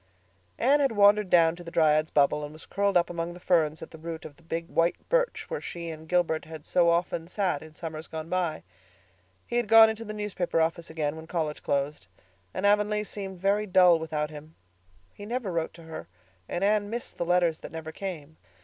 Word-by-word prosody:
Anne 275 +5 +4
had 275 -5 +2
wandered 205 -1 +5
down 165 -2 +5
to 175 - -11
the 170 - -8
Dryad's 155 -2 +3
Bubble 145 +1 +2
and 145 +1 -7
was 155 - -12
curled 200 -1 +1
up 170 - +2
among 170 0 -4
the - - -11
ferns 160 -4 +1
at - - -10
the 160 - -11
root 165 0 -6
of 145 - -10
the 170 - -23
big 165 0 -4
white 170 +1 +2
birch - - +1
where 480 - -4
she 170 -1 -6
and 160 0 -10
Gilbert 175 -3 +1
had 155 -1 -10
so 175 -1 +3
often 170 -1 0
sat 180 -5 -1
in 155 0 -13
summers 160 -1 -6
gone 160 0 -6
by. 175 -3 -1 0.8
He 240 - -2
had 240 -2 +1
gone 225 +1 +8
into 220 +1 -7
the 215 -1 -6
newspaper 200 -5 -1
office 165 +1 0
again 155 -2 -2
when 160 0 -10
college 155 -4 -2
closed, 140 -7 -2 0.4
and 190 - -3
Avonlea 210 +1 +3
seemed 195 -3 -7
very 200 +3 +1
dull 180 -3 +6
without 155 -1 -3
him. 155 +1 -11 0.6
He 205 - -10
never 235 -4 -2
wrote 165 -1 -2
to 165 - -13
her, 160 - -8 0.4
and 175 - -2
Anne 205 0 +2
missed 235 +2 -6
the - - +1
letters 175 -2 +2
that - - -9
never 160 -1 -6
came. 160 -4 -7
170 Hz, 215 wpm, -27 LUFS, 160-200 Hz, 0.8 s, gone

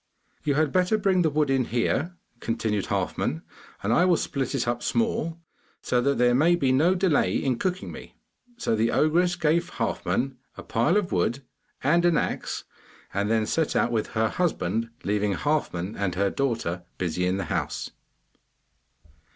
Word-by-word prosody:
'You 145 -2 +1
had 155 -1 +2
better 185 +4 +2
bring 195 -3 +2
the 160 - +3
wood 150 -1 +1
in 130 -2 +2
here,' 135 +9 0 0.2
continued 110 -4 -1
Halfman, 80 - -1 0.4
'and 105 +4 +1
I 175 - +4
will 180 -2 +4
split 135 0 -2
it 120 -3 -1
up 120 0 -1
small, 165 - 0 0.5
so 125 - +1
that 140 +2 +1
there 120 0 +4
may 160 +7 +4
be 140 -6 +1
no 160 +8 +4
delay 180 -5 +2
in 130 -3 -1
cooking 185 0 -2
me.' - - -11 0.4
So 235 - 0
the 110 +2 +2
ogress 175 +6 +2
gave 170 +1 +1
Halfman 125 +2 -1 0.2
a - - -8
pile 135 - +2
of 205 -4 -1
wood 115 +10 0 0.4
and 170 +5 +3
an 175 -3 +4
axe, - - -2 0.5
and 100 +1 0
then 110 -1 +2
set 160 +7 0
out 120 - +2
with 110 -2 0
her 110 0 +3
husband, 115 - -1
leaving 105 0 0
Halfman 110 - -1
and 100 -3 -2
her 100 +1 +1
daughter 115 -10 -1 0.2
busy 90 0 -1
in 95 +1 0
the 95 - -3
house. - - -3
135 Hz, 170 wpm, -26 LUFS, 110-170 Hz, 0.5 s, I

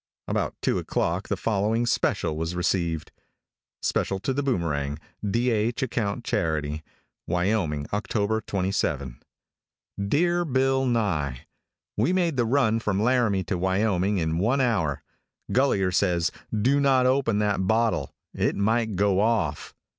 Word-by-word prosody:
About - - -1
two - - +1
o'clock 85 +4 -1
the - - -1
following 110 +2 0
special 95 -8 0
was 80 +2 -3
received: 85 -3 -1 0.7
[Special 95 - 0
to 135 - -1
the 140 - 0
Boomerang.] 75 - -1 0.3
"[D. 115 +5 +1
H. 115 +4 0
acct. 115 -2 -2
charity.] 75 -4 -1 0.5
"Wyoming, 90 -5 0
October 105 +1 0
27. 85 - -2 0.9
"Dear 175 - +2
Bill 135 -2 +1
Nye: 85 - -1 0.5
"We 180 - +2
made 175 -4 +1
the 120 -2 +1
run 115 -2 +2
from 105 -3 -1
Laramie 115 -4 +2
to 90 -2 -3
Wyoming 95 +1 +1
in 80 -1 0
one 115 +8 +2
hour. 105 - 0 0.5
Gulliher 100 -8 +2
says, 90 -3 +1 0.2
do 125 +7 +2
not 135 -2 +3
open 130 -4 +2
that 105 -3 0
bottle; 110 - +1 0.2
it - - 0
might 110 +1 +1
go 100 0 +2
off. 105 -9 0
105 Hz, 130 wpm, -25 LUFS, 90-120 Hz, 0.9 s, not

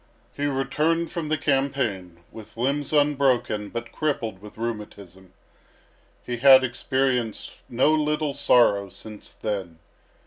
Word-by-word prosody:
He 145 0 -2
returned 150 +5 0
from 165 -3 -4
the 155 - +1
campaign 130 - -1
with 110 0 -13
limbs 140 +4 -1
unbroken 135 -8 +1
but 115 0 -6
crippled 115 -10 -3
with 105 +1 -13
rheumatism. 100 -5 -7 0.9
He 120 -1 -3
had 130 +1 +7
experienced 125 -2 -1
no 130 +6 +3
little 150 -1 0
sorrow 120 -8 +3
since 105 +2 -11
then. 95 -6 -5
125 Hz, 115 wpm, -24 LUFS, 105-145 Hz, 0.9 s, had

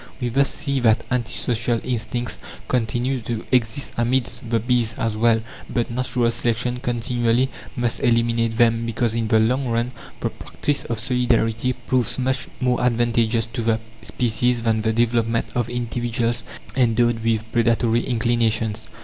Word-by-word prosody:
We 125 -2 -1
thus 140 +4 +2
see 140 -2 -1
that 115 -3 +3
anti 125 -3 0
social 115 0 0
instincts 120 -1 -3 0.3
continue 125 +2 0
to 115 0 -4
exist 125 +1 +1
amidst 120 -1 0
the 115 -1 +2
bees 120 -1 +1
as 115 -2 -1
well; 115 0 +3 0.3
but 120 -1 -1
natural 120 -1 0
selection 120 +1 0
continually 120 +1 0 0.2
must 120 -2 0
eliminate 115 -2 +1
them, 115 -1 +3
because 115 0 0
in 115 -1 -1
the 110 - +4
long 125 +5 +2
run 120 +1 0 0.3
the - - -1
practice 145 -1 -2
of 115 - -3
solidarity 120 -1 +1
proves 125 -1 0
much 130 +1 -1
more 125 -2 +1
advantageous 115 -2 +2
to 125 - -2
the 115 0 +1 0.2
species 120 +1 0
than 110 -1 +1
the 110 0 +1
development 115 0 +1
of 120 -1 -1
individuals 120 -1 -1 0.3
endowed 120 -2 +2
with 115 -1 +1
predatory 115 0 +2
inclinations. 115 -2 0
120 Hz, 150 wpm, -22 LUFS, 115-125 Hz, 0.3 s, the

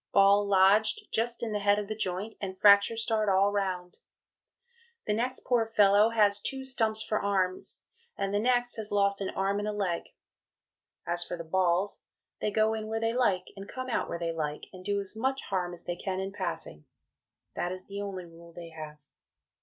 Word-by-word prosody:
Ball 200 +1 +6
lodged 200 +3 +4
just 235 +1 -1
in 225 - -2
the 210 - 0
head 205 0 +3
of 210 -1 -3
the 215 - -3
joint 200 +1 -3
and 190 -2 -4
fracture 200 +3 +6
starred 220 -2 +1
all 195 +1 +4
round. 185 -3 -3 1.1
The 210 - 0
next 245 +4 -1
poor 235 -3 +2
fellow 210 -1 +5
has 205 -3 +3
two 265 +3 -4
Stumps 220 -4 +1
for 215 - -1
arms, 190 -2 -1 0.3
and 195 0 -2
the 205 - +2
next 245 +1 +1
has 215 -1 -4
lost 200 -1 +2
an 195 - -2
arm 195 +1 -1
and 205 - -3
a - - 0
leg. 195 -5 -2 1.0
As 175 0 0
for 175 - -5
the 170 - -6
Balls 185 +3 0 0.4
they - - 0
go 215 +1 +2
in 220 -1 -4
where 220 0 -2
they 225 0 0
like 200 -7 +1
and 195 0 -9
come 255 -1 -5
out - - -1
where - - -3
they 170 -1 -2
like 150 -2 -4
and 185 -1 -11
do 200 +1 0
as 200 +1 -4
much 265 +4 -1
harm 180 -2 -2
as 175 -1 -10
they 175 - -3
can 185 +1 -3
in 190 +1 -3
passing. 170 - -5 0.7
That 175 - -2
is 185 0 -5
the 200 0 -6
only 190 -3 -5
rule 170 0 -15
they 170 -1 -9
have.... 155 -2 -9
200 Hz, 200 wpm, -29 LUFS, 185-220 Hz, 1.1 s, Ball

